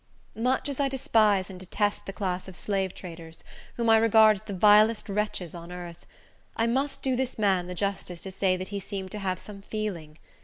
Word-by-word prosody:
Much 250 +6 0
as 280 -1 -4
I 275 -1 +2
despise 215 -7 +2
and 185 - -9
detest 205 +3 -1
the - - -3
class 185 -3 -3
of 190 - -9
slave 195 -2 -2
traders, 165 -2 -9 0.3
whom 235 -1 -1
I 225 0 +7
regard 220 -1 +6
as - - -11
the 215 -2 -7
vilest 210 +3 +5
wretches 200 -4 -2
on 170 0 -9
earth, 175 -1 -9 0.5
I 225 - +1
must 270 +4 -1
do 260 -1 +1
this 260 0 -2
man 190 -4 +2
the 180 - -6
justice 190 -3 -3
to 190 - -6
say 190 -1 +1
that 185 +1 -6
he 200 0 -3
seemed 190 -1 -6
to 210 - -5
have 185 -2 -1
some 200 +2 -10
feeling. 190 -8 -5
200 Hz, 205 wpm, -27 LUFS, 185-220 Hz, 0.5 s, I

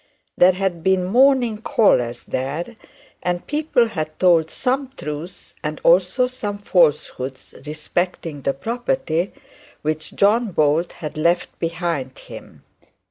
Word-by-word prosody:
There 180 +1 +6
had 185 -2 -2
been 190 -1 +2
morning 245 +1 +3
callers 120 - +2
there, 145 - -4 0.5
and 175 0 -2
people 295 -6 +1
had 155 -7 -4
told 170 -3 +4
some 265 +1 -1
truth 150 +4 -7
and 150 0 -3
also 185 +8 +4
some 210 -5 -4
falsehood 150 -8 +1 0.3
respecting 155 0 -3
the 135 - -1
property 225 - -1 0.5
which 155 +1 -3
John 215 +1 +3
Bold 155 +2 +2
had 155 -1 -7
left 170 +3 +2
behind 165 -6 -2
him. - - -12
175 Hz, 120 wpm, -21 LUFS, 155-215 Hz, 0.5 s, There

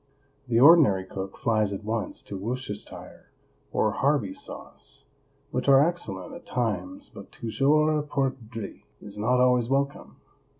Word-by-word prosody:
The 115 -1 +2
ordinary 135 - +6
cook 95 0 -7
flies 110 -3 +1
at 100 +1 -5
once 110 +1 -3
to 100 - -7
Worcestershire 110 +1 -6 0.4
or 110 - +1
Harvey 130 -4 +1
sauce, - - -8 0.5
which - - -1
are 140 +3 +7
excellent 100 - -2
at - - -10
times, 130 - -3
but - - -11
"toujours 150 +6 +1
perdrix" 120 -7 -3 0.2
is 105 0 -9
not 125 +4 +2
always 125 -2 +3
welcome. 140 +1 -1
125 Hz, 130 wpm, -26 LUFS, 105-140 Hz, 0.5 s, are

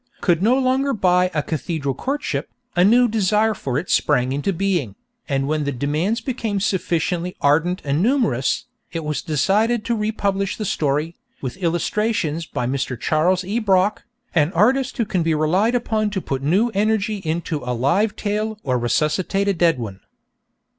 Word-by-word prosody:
could 175 -2 +2
no 235 +6 +4
longer 270 +1 +1
buy 180 -4 +3
'A 150 - +1
Cathedral 155 -3 -2
Courtship,' 285 - -3 0.3
a 175 - +4
new 240 +5 +5
desire 215 0 +2
for 135 -10 -3
it 170 +5 -3
sprang 130 -3 +2
into 145 +8 -1
being, 175 - -1 0.3
and 135 -1 0
when 155 0 0
the 140 - -1
demands 150 - -1
became 230 -5 -2
sufficiently 180 -2 -1
ardent 165 +6 +2
and 145 +3 +1
numerous, 220 - +1 0.3
it 165 -1 -4
was 150 -1 -2
decided 210 - +1
to 235 0 0
republish 200 -3 -1
the 215 - -3
story, 155 0 -1 0.2
with 130 -3 -5
illustrations 175 -2 -1
by 125 - -3
Mr. 130 -1 -2
Charles 180 +7 +1
E. 205 +6 -1
Brock, 195 -2 +2 0.3
an 160 -1 +2
artist 255 +8 +2
who 230 - +1
can 190 -4 -1
be 165 -1 +1
relied 185 +10 +2
upon 220 -3 0
to 205 -2 -2
put 135 -6 -3
new 190 +12 +2
energy 215 0 0
into 165 -3 -3
a 125 0 -2
live 175 - +1
tale 215 +1 -2
or 130 -2 0
resuscitate 155 - 0
a 200 - +3
dead 165 -3 +2
one. 105 -6 -6
180 Hz, 165 wpm, -21 LUFS, 150-215 Hz, 0.3 s, new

